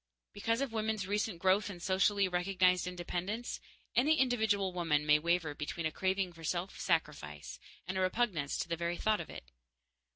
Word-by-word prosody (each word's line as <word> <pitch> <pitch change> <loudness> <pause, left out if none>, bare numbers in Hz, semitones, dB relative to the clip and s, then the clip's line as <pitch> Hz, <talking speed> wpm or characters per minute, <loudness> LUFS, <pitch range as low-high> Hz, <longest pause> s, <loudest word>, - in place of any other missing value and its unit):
Because 230 +4 0
of 270 -5 -2
women's 220 -2 -1
recent 205 -1 -1
growth 190 +4 +2
in 185 -3 -7
socially 195 +2 +2
recognized 180 0 +2
independence, 180 +6 -3 0.4
any 295 +6 +4
individual 220 - +2
woman 165 -4 +1
may 150 0 +5
waver 170 -1 +1
between 155 +3 -4
a 160 - 0
craving 190 +1 0
for 165 -1 -13
self 175 +4 -2
sacrifice 145 - -2 0.3
and 190 +1 -2
a - - +1
repugnance 185 -7 0
to - - -2
the 170 - -1
very 170 +1 -2
thought 215 -1 +1
of - - -9
it. - - -10
185 Hz, 170 wpm, -33 LUFS, 170-205 Hz, 0.4 s, may